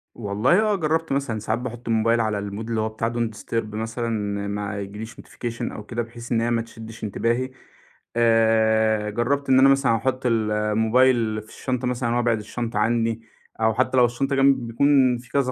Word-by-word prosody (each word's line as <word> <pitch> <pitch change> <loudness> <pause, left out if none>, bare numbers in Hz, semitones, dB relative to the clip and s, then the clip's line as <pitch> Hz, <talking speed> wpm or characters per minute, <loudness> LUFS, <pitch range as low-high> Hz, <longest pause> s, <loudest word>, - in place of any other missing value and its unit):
والله 110 - +2
آه 215 -1 +2
جرّبت 160 -2 -1
مثلًا 135 -5 -1
ساعات 110 +2 -2
باحط 120 -1 -7
الموبايل 115 +1 +2
على 110 -2 -1
المود 100 +3 -6
اللي 115 -1 0
هو 110 - -1
بتاع 110 +1 -2
Don't 120 -1 0
disturb 110 -1 -4
مثلًا 115 +2 -3 0.4
ما 100 0 -3
ييجيليش 105 +3 -7
notification 115 -1 -6
أو 105 - -8
كده 120 +2 -3
بحيث 120 0 -9
إنّ 115 -1 +2
هي 120 +1 0
ما 115 -1 +1
تشدش 115 -1 -11
انتباهي. 115 +4 -1 0.6
آآ 110 -2 +3
جرّبت 135 +6 -1
إن 130 0 +6
أنا 135 +1 +7
مثلًا 135 -4 +3
احُط 130 +3 -2
ال 110 -3 +1
الموبايل 110 +1 +2
في 110 - -18
الشنطة 125 -1 -3
مثلًا 120 -1 -1
وابعِد 120 -2 +1
الشنطة 115 +1 -4
عنّي 115 +1 +1 0.4
أو 110 0 +3
حتّى 130 +3 +1
لو 125 - +7
الشنطة 135 +4 -1
جنبي 135 -2 +3
بيكون 130 +1 +3
في 125 +1 -14
كذا 135 -2 +1
115 Hz, 185 wpm, -23 LUFS, 110-125 Hz, 0.6 s, أنا